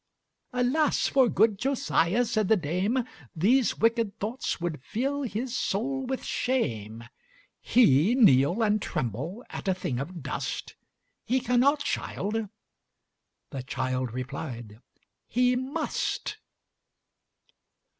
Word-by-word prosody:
"Alas! 255 +5 +2
for 260 -3 +4
good 215 -2 +3
Josiah," 245 -5 +1
said 215 -3 0
the 220 - +5
dame, 185 - 0 0.3
"These 230 +10 +3
wicked 230 -2 +1
thoughts 225 +4 -3
would 170 -5 -3
fill 270 - -2
his 245 0 -3
soul 265 +5 -1
with 265 0 -3
shame; 115 - -2 0.6
He 210 - +4
kneel 175 - +5
and 210 -1 +2
tremble 145 - -4
at - - -6
a 190 - +2
thing 130 -9 -3
of 165 +3 -6
dust! - - -4 0.5
He 260 +2 +1
cannot, 255 +4 +3
child:" 215 -3 -2 1.0
the 135 -3 -4
child 130 -1 -2
replied, 120 -3 -6 0.5
"He 250 +1 +2
must." 305 +9 -2
215 Hz, 110 wpm, -27 LUFS, 150-250 Hz, 1.0 s, the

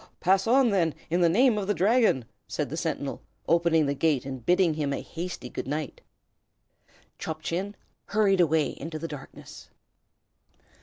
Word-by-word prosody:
"Pass 190 +3 +2
on, 250 0 +4
then, 170 -6 +1 0.2
in 175 +1 +2
the 170 - +5
name 230 +4 +4
of 195 - -4
the 205 - +1
Dragon!" 210 - +3 0.2
said - - -3
the - - -3
sentinel, - - -3 0.3
opening 165 -2 +3
the 140 - 0
gate; 145 -2 +1
and 130 -3 -6
bidding 180 +3 +3
him 150 -2 -2
a - - -2
hasty 170 -5 -6
good 125 - -6
night, 150 -1 -4 1.2
Chop 160 -1 -5
Chin 195 +5 -3 0.3
hurried 200 -3 +3
away 160 -2 +2
into 155 +1 -5
the 165 +2 -5
darkness. 145 -4 -11
170 Hz, 160 wpm, -27 LUFS, 150-195 Hz, 1.2 s, the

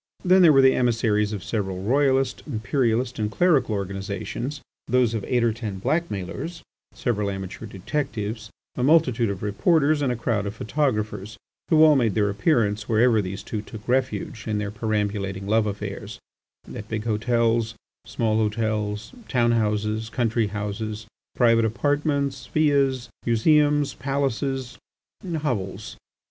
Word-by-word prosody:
Then 185 +1 +6
there 170 -3 +8
were 135 -2 +6
the 130 - +6
emissaries 110 -4 +1
of 105 -3 -5
several 95 -4 -3
royalist, 135 +3 +2
imperialist, 120 0 0
and 105 -1 0
clerical 135 - +2
organisations, 100 +7 -4 0.3
those 125 -2 +2
of 110 -3 -2
eight 120 -2 +1
or 115 -2 +2
ten 110 -4 -5
blackmailers, 165 - -3 0.3
several 105 -5 -1
amateur 95 +3 -6
detectives, 110 +1 -4 0.3
a - - -3
multitude 125 -6 +3
of 100 -1 -5
reporters, 145 - +2
and 135 -3 +1
a - - -1
crowd 110 -3 -1
of 100 - -5
photographers, 110 -4 -2 0.3
who 155 -1 +6
all 155 -1 +7
made 115 -7 +2
their 105 -2 +2
appearance 105 -2 +1
wherever 115 0 +4
these 95 0 -6
two 110 - -4
took 105 0 -11
refuge 125 -3 -1
in 105 -1 0
their 105 -1 -3
perambulating 105 -3 -2
love 110 +1 +2
affairs, 100 -1 -5 0.6
at 105 - -8
big 110 -1 -3
hotels, 115 0 +1 0.3
small 110 -2 0
hotels, 110 -1 -1
town 120 -3 +2
houses, 110 0 0
country 115 -1 0
houses, 105 +1 -4 0.3
private 115 -2 +4
apartments, 140 +2 0
villas, 140 -5 +1
museums, 145 +5 +3
palaces, 135 -2 -2 0.6
hovels. 105 -7 -3
115 Hz, 135 wpm, -24 LUFS, 105-130 Hz, 0.6 s, there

